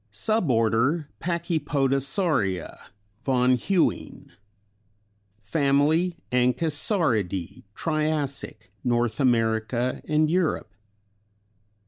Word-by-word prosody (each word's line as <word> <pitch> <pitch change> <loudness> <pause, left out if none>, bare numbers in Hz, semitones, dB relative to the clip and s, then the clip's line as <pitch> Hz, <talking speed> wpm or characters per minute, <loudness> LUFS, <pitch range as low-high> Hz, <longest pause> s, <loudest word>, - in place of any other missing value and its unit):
Suborder 130 - +2 0.2
Pachypodosauria 140 - -1 0.4
von 125 -1 +2
Huene. 175 +8 -1 1.1
Fam. 140 +6 +1
Anchisauridæ 145 - 0
Triassic, 150 - -2
North 120 -1 0
America 120 0 0
and 155 0 +2
Europe. 160 - -1
135 Hz, 55 wpm, -25 LUFS, 115-160 Hz, 1.1 s, Suborder